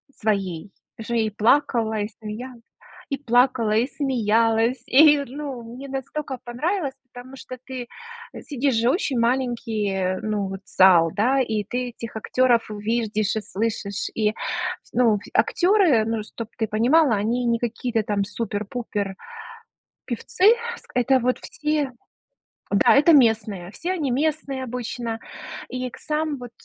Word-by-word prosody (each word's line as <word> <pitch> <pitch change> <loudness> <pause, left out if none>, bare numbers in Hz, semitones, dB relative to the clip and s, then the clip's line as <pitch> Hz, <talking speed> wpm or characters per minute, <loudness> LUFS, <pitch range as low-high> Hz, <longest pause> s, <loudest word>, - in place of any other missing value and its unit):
своей. 195 -5 -2 0.3
Уже 230 +1 -3
и 220 -1 +1
плакала, 225 0 +2
и 205 - -1
смеялась 235 +3 -7 0.5
и 275 - -1
плакала, 245 -4 +2
и 230 +3 +3
смеялась. 230 -3 +1
И, 295 +2 +7
ну, 275 -2 -6
мне 275 +2 -8
настолько 270 0 -5
понравилось! 280 +4 -2 0.2
Потому 250 +2 -10
что 255 -1 -9
ты 255 -2 -6 0.5
сидишь 275 -2 -1
же, 235 +2 +2
очень 270 - 0
маленький, 225 -6 0
ну 210 -2 -1
вот, 195 0 -6
зал, 175 -3 +5
да, 255 +6 +2
и 220 -5 0
ты 245 +2 -3
этих 230 -1 -9
актёров 240 +1 +2
видишь 215 0 -1
и 220 - -1
слышишь, 205 -1 -3
и 215 -1 +2 0.5
с - - -25
ну, 230 -4 +3
актёры, 345 - +4
ну, 225 -1 -2
чтоб 225 +1 -8
ты 220 -1 0
понимала, 245 +6 +3
они 235 +5 0
не 235 -1 +1
какие-то 235 -1 -1
там 205 -1 0
супер-пупер 205 -1 -4 0.9
певцы, 275 - -1 0.3
ск - - -17
это 260 +1 +3
вот 250 +1 +1
все 300 -3 -2 0.8
да, 200 +6 +5
это 310 +4 +6
местные, 215 - +3
все 355 - -3
они 300 -8 -1
местные 275 -1 -1
обычно. 240 -2 -4 0.5
И, 255 0 -4
к - - -13
сам 305 -2 -2
вот 245 -1 -9
235 Hz, 140 wpm, -23 LUFS, 215-265 Hz, 0.9 s, И